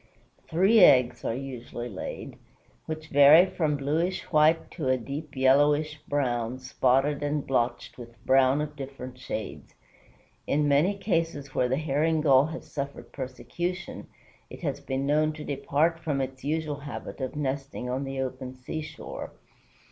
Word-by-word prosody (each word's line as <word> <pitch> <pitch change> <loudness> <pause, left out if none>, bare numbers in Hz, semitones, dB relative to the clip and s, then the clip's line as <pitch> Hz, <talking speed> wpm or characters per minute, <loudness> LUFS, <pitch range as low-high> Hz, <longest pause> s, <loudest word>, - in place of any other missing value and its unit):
Three 190 +7 +4
eggs 125 -8 +5
are 115 - -1
usually 125 -2 -6
laid, 95 -6 -7 0.5
which 155 0 -6
vary 145 +4 +8
from 155 -5 -1
bluish 155 +6 -1
white 155 +1 +3
to 155 -6 -4
a 130 0 +3
deep 140 +4 -7
yellowish 145 +3 +3
brown, 125 -4 -1
spotted 130 +3 +1
and 145 0 -1
blotched 120 -1 -1
with 120 -1 -10
brown 135 +2 +4
of 150 0 -5
different 130 -2 -8
shades. 110 -4 -6 0.7
In 145 +1 +2
many 155 +8 +3
cases 165 -8 -2
where 125 - +1
the 130 - +1
Herring 155 +1 +1
Gull 140 -1 +5
has 160 +1 -8
suffered 140 -1 -6
persecution, 170 +7 -5 0.4
it - - -11
has 140 -4 -2
been 135 -1 -3
known 155 +2 +2
to 150 0 -8
depart 145 +4 0
from 150 -4 -2
its 130 0 -4
usual 150 0 -2
habit 140 0 -7
of 130 +3 -4
nesting 135 -2 -3
on 130 +2 -2
the 135 -1 -3
open 130 0 -5
seashore. 155 +5 -7
140 Hz, 150 wpm, -27 LUFS, 130-155 Hz, 0.7 s, vary